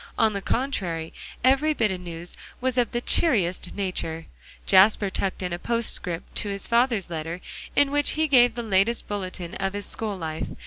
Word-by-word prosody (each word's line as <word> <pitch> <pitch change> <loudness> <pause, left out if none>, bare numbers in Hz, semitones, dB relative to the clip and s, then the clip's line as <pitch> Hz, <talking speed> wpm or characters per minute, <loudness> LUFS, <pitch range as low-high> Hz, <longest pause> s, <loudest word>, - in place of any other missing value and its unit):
On 220 -2 +3
the 200 - -3
contrary, 185 -11 -2 0.3
every 275 +4 +4
bit 220 -6 +2
of 185 - -3
news 170 0 -7 0.2
was 255 0 0
of 245 -2 +2
the 240 -1 -1
cheeriest 185 - +2
nature; 170 -4 -2 0.4
Jasper 200 +1 +5
tucked 190 0 -2
on 180 -1 -2
a 175 - -3
postscript 215 -7 -2
to 205 - -2
his 200 0 -3
father's 235 -6 +1
letter, 165 +2 -4 0.4
in 285 -1 +4
which 290 +1 +1
he 315 0 +2
gave 245 -4 +5
the 240 - -3
latest 215 +2 +1
bulletin 185 -4 -5
of 195 0 -2
his 205 -1 -4
school 215 -3 -3
life. 160 -2 -4
200 Hz, 180 wpm, -25 LUFS, 180-240 Hz, 0.4 s, Jasper